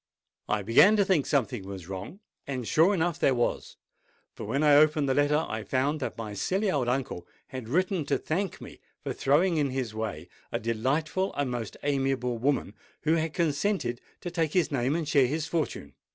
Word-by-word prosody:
I 105 Hz, -1 st, 0 dB
began 125 Hz, -, +6 dB
to 205 Hz, -2 st, +3 dB
think 185 Hz, -8 st, +2 dB
something 125 Hz, -5 st, 0 dB
was 95 Hz, -3 st, -8 dB
wrong; 95 Hz, -, -7 dB, 0.3 s
and 130 Hz, -4 st, -4 dB
sure 165 Hz, +5 st, +4 dB
enough 170 Hz, -1 st, 0 dB
there 135 Hz, -, +3 dB
was! 120 Hz, -, -2 dB, 0.6 s
For, -, -, -7 dB
when 135 Hz, +8 st, 0 dB
I 150 Hz, -1 st, +6 dB
opened 150 Hz, -1 st, +4 dB
the 135 Hz, -, +2 dB
letter, 145 Hz, +3 st, +2 dB
I 110 Hz, 0 st, -4 dB
found 135 Hz, +7 st, 0 dB
that 130 Hz, -, -4 dB
my 110 Hz, -2 st, -5 dB
silly 190 Hz, -, 0 dB
old 135 Hz, -6 st, 0 dB
uncle 125 Hz, -8 st, -2 dB, 0.2 s
had 130 Hz, -4 st, -7 dB
written 180 Hz, +2 st, +1 dB
to -, -, +1 dB
thank 185 Hz, +3 st, -2 dB
me -, -, -11 dB, 0.2 s
for -, -, -3 dB
throwing 165 Hz, +5 st, +2 dB
in 145 Hz, -2 st, +1 dB
his 130 Hz, -4 st, -3 dB
way 110 Hz, -7 st, -4 dB, 0.2 s
a -, -, -1 dB
delightful 140 Hz, -, -1 dB
and 140 Hz, -3 st, -1 dB
most 120 Hz, -3 st, -5 dB
amiable 135 Hz, -4 st, 0 dB
woman, 135 Hz, +3 st, 0 dB, 0.3 s
who 155 Hz, -, +2 dB
had 160 Hz, -1 st, -1 dB
consented 155 Hz, -, 0 dB, 0.2 s
to 175 Hz, -, -5 dB
take 165 Hz, -3 st, -1 dB
his 180 Hz, -3 st, +2 dB
name 135 Hz, +1 st, 0 dB
and 165 Hz, -3 st, -2 dB
share 140 Hz, -3 st, +4 dB
his 155 Hz, +4 st, -2 dB
fortune. 155 Hz, -, -3 dB
140 Hz, 195 wpm, -28 LUFS, 120-160 Hz, 0.6 s, began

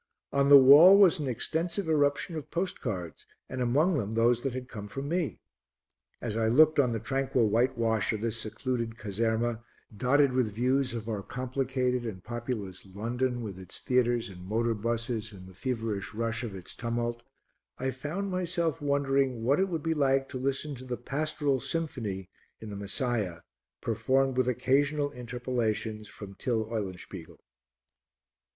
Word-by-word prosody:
On 140 Hz, 0 st, +3 dB
the 145 Hz, -, +11 dB
wall 145 Hz, +9 st, +9 dB
was 190 Hz, -5 st, +6 dB
an 145 Hz, -, -2 dB
extensive 165 Hz, -, -1 dB
eruption 150 Hz, +2 st, +1 dB
of 155 Hz, -, -6 dB
postcards 105 Hz, -, -4 dB, 0.2 s
and 130 Hz, 0 st, -4 dB
among 145 Hz, +7 st, +2 dB
them 105 Hz, -1 st, -3 dB
those 115 Hz, +1 st, +3 dB
that 135 Hz, -2 st, -2 dB
had 130 Hz, -1 st, -5 dB
come 105 Hz, -5 st, -7 dB
from 135 Hz, +5 st, -5 dB
me. 170 Hz, -1 st, -1 dB, 0.8 s
As 110 Hz, -3 st, -4 dB
I 115 Hz, 0 st, +1 dB
looked 155 Hz, +6 st, +5 dB
on 125 Hz, -4 st, +4 dB
the 115 Hz, -, -1 dB
tranquil 135 Hz, -2 st, +1 dB
whitewash 115 Hz, -2 st, +1 dB
of 110 Hz, -2 st, -3 dB
this 115 Hz, -1 st, -1 dB
secluded 115 Hz, +1 st, -3 dB
caserma, 115 Hz, +2 st, -1 dB, 0.3 s
dotted 135 Hz, +4 st, +3 dB
with 120 Hz, -5 st, 0 dB
views 130 Hz, +2 st, +1 dB
of 115 Hz, -1 st, -5 dB
our 105 Hz, -3 st, -2 dB
complicated 125 Hz, +1 st, -1 dB
and 100 Hz, -6 st, -6 dB
populous 120 Hz, -5 st, -5 dB
London, 120 Hz, +5 st, -2 dB
with 100 Hz, -4 st, -6 dB
its 95 Hz, -1 st, -8 dB
theatres 120 Hz, -2 st, +1 dB
and 90 Hz, -2 st, -11 dB
motor 115 Hz, +4 st, 0 dB
buses 115 Hz, 0 st, -2 dB
and 95 Hz, -2 st, -12 dB
the 95 Hz, -, -13 dB
feverish 110 Hz, -2 st, -3 dB
rush 115 Hz, +1 st, -1 dB
of 110 Hz, -5 st, -5 dB
its 90 Hz, -2 st, -8 dB
tumult, 120 Hz, 0 st, -2 dB, 0.6 s
I 130 Hz, +1 st, -1 dB
found 155 Hz, +10 st, -4 dB
myself 170 Hz, -3 st, -1 dB
wondering 135 Hz, -4 st, +1 dB
what 140 Hz, +7 st, +3 dB
it 190 Hz, 0 st, +2 dB
would 165 Hz, -4 st, -3 dB
be 165 Hz, -, +1 dB
like 135 Hz, -2 st, +2 dB
to 130 Hz, -, -5 dB
listen 140 Hz, +3 st, -2 dB
to 125 Hz, -, -10 dB
the 125 Hz, -1 st, -4 dB
Pastoral 145 Hz, +1 st, -1 dB
Symphony 115 Hz, -, -3 dB, 0.3 s
in 110 Hz, -1 st, -8 dB
the -, -, -5 dB
Messiah, 100 Hz, -3 st, -2 dB, 0.4 s
performed 135 Hz, 0 st, +1 dB
with 130 Hz, -1 st, +2 dB
occasional 145 Hz, +4 st, +1 dB
interpolations 120 Hz, -4 st, -3 dB
from 100 Hz, -1 st, -9 dB
Till 110 Hz, +2 st, -1 dB
Eulenspiegel. 95 Hz, -6 st, -6 dB
125 Hz, 160 wpm, -29 LUFS, 110-140 Hz, 0.8 s, the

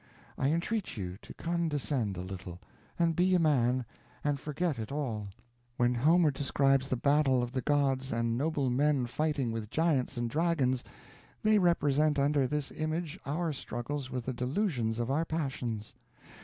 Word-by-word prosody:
I 135 Hz, -, +1 dB
entreat 175 Hz, -, -1 dB
you 90 Hz, -2 st, -4 dB
to -, -, -11 dB
condescend 145 Hz, -, -1 dB
a -, -, -3 dB
little, 95 Hz, -2 st, -7 dB, 0.4 s
and 170 Hz, -1 st, +2 dB
be 185 Hz, +2 st, +3 dB
a -, -, +4 dB
man, 130 Hz, -6 st, +2 dB, 0.4 s
and 145 Hz, -1 st, 0 dB
forget 150 Hz, -1 st, -2 dB
it 110 Hz, +2 st, -5 dB
all. 120 Hz, -8 st, -2 dB, 0.5 s
When 120 Hz, 0 st, +3 dB
Homer 155 Hz, +6 st, +4 dB
describes 135 Hz, -1 st, +2 dB
the 130 Hz, -, -1 dB
battle 140 Hz, -2 st, +3 dB
of 120 Hz, -, -4 dB
the 130 Hz, -1 st, -1 dB
gods 135 Hz, -2 st, +1 dB
and 115 Hz, 0 st, 0 dB
noble 140 Hz, -1 st, 0 dB
men 140 Hz, 0 st, +2 dB
fighting 140 Hz, -1 st, -1 dB
with 110 Hz, -2 st, -4 dB
giants 155 Hz, -6 st, +1 dB
and 120 Hz, 0 st, 0 dB
dragons, 140 Hz, -3 st, +1 dB, 0.6 s
they 215 Hz, -1 st, +5 dB
represent 150 Hz, -4 st, +3 dB
under 140 Hz, -1 st, +3 dB
this 150 Hz, 0 st, -2 dB
image 155 Hz, 0 st, -3 dB
our 160 Hz, +2 st, -1 dB
struggles 130 Hz, +1 st, -4 dB
with 125 Hz, -2 st, -4 dB
the 130 Hz, -, -2 dB
delusions 125 Hz, -, -1 dB
of 120 Hz, +2 st, -1 dB
our 155 Hz, +4 st, +2 dB
passions. 135 Hz, -9 st, -3 dB
140 Hz, 160 wpm, -31 LUFS, 120-155 Hz, 0.6 s, they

